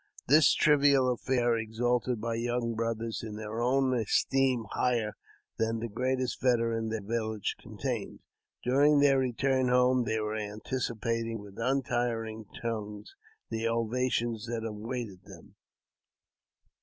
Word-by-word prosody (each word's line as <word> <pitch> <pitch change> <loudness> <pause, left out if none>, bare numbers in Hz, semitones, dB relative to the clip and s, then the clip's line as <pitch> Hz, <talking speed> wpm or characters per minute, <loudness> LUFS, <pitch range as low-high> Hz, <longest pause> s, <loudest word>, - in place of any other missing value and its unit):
This 150 +2 +6
trivial 140 -3 +4
affair 120 -1 +1
exalted 120 +2 0
my 115 +1 -2
young 120 0 -1
brothers 115 0 -2
in 110 -2 -6
their 110 +1 -4
own 130 +1 +2
esteem 125 +1 +1
higher 115 -4 0 0.4
than 115 0 +1
the 115 +1 -3
greatest 130 +3 -1
veteran 115 -3 +1
their 110 -2 -3
village 110 -1 -2
con - - -12
tained. - - -3 0.5
During 145 +4 +4
their 140 -1 +5
return 130 +1 +1
home 125 0 +3
they 110 0 0
were 105 0 -2
anticipating 115 +1 -3
with 100 -1 -11
untiring 120 -3 -1 0.2
tongues 105 - -4 0.4
the 115 0 -1
ovation 115 +1 0
that 115 -1 -3
awaited 110 -2 -5
them. - - -14
115 Hz, 125 wpm, -30 LUFS, 110-125 Hz, 0.5 s, This